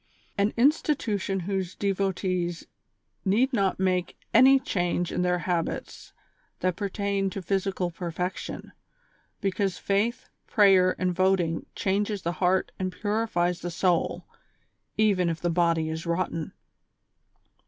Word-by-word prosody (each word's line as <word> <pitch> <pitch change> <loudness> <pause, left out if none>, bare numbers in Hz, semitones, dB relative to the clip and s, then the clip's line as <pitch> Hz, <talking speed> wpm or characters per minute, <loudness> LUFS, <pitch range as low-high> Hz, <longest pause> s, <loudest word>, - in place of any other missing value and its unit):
An 200 +1 +2
institution 235 -8 +1
whose 190 -1 -3
devotees 185 -3 -1 0.6
need 235 +7 +2
not 195 -5 +1
make 185 -2 0 0.2
any 265 +3 +7
change 175 - -1
in - - -1
their 180 0 +2
habits 175 0 -3 0.5
that 185 -1 +1
pertain 200 0 -1
to 195 - -5
physical 190 -1 -1
pei 170 +1 -5
fection; 180 +3 -4 0.7
because 195 -1 0
faith, 205 +4 0 0.2
prayer 190 -3 +5
and 185 -1 0
voting 180 -3 +1
changes 200 0 -1
the 170 - 0
heart 185 +1 +2
and 185 -1 -1
purifies 205 -5 -1
the 175 - -3
soul, 175 0 0 0.7
even 195 -5 +3
if 165 0 -3
the 175 - 0
body 165 -2 +2
is 160 +1 -4
rotten. 170 -2 -2
185 Hz, 120 wpm, -27 LUFS, 175-200 Hz, 0.7 s, any